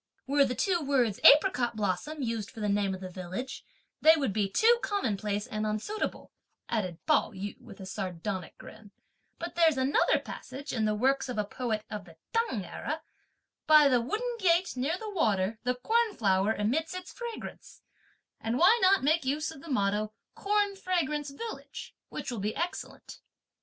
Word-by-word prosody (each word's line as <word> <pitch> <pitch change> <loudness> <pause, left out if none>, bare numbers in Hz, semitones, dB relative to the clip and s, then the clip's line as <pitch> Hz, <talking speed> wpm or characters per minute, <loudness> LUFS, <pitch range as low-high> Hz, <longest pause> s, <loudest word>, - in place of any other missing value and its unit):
'" - - -44
"Were 280 +1 +4
the 250 -1 -2
two 360 +2 +1
words 255 -8 +1
'apricot 255 -6 +6
blossom' 215 - -2
used 225 -3 -2
for - - -11
the 210 - -1
name 200 -1 +1
of 185 - -11
the 185 - -6
village, 185 +8 -6 0.4
they 320 +1 +8
would 275 -10 -1
be 205 -1 0
too 470 - +4
commonplace 210 - -1
and 215 -4 -4
unsuitable;" 215 - -3 0.4
added 185 -7 -2
Pao 305 -7 +2
yü 200 +1 -6
with 210 -4 -13
a 190 - -7
sardonic 185 -1 -4
grin, 215 -1 -13 0.5
"but 340 +1 -5
there's 325 -4 +4
another 260 +2 +3
passage 275 +3 -7
in 220 -3 +1
the 215 0 +1
works 265 +4 +1
of 245 - -4
a 210 - 0
poet 220 -1 -3
of 210 -3 -5
the 165 -3 -16 0.2
T'ang 455 - 0
era: 310 - -5 0.6
'By 305 -2 +8
the 250 -3 +3
wooden 470 - -2
gate 360 -3 +2
near 275 +7 -1
the 440 - -7
water 215 - +1
the 250 0 +1
corn 445 - +1
flower 195 -1 +2
emits 310 - -1
its 365 0 -7
fragrance;' 475 -2 -8 0.6
and 225 +2 -1
why 400 - +6
not 380 -2 +5
make 310 +3 +3
use 295 +4 -1
of 275 - -12
the 330 - -11
motto 210 -3 0 0.2
'corn 410 -1 +1
fragrance 310 -6 -1
village,' 440 +11 -8 0.2
which - - -5
will 235 - -4
be 210 +2 -2
excellent?" 355 +3 -5
255 Hz, 180 wpm, -29 LUFS, 210-330 Hz, 0.6 s, they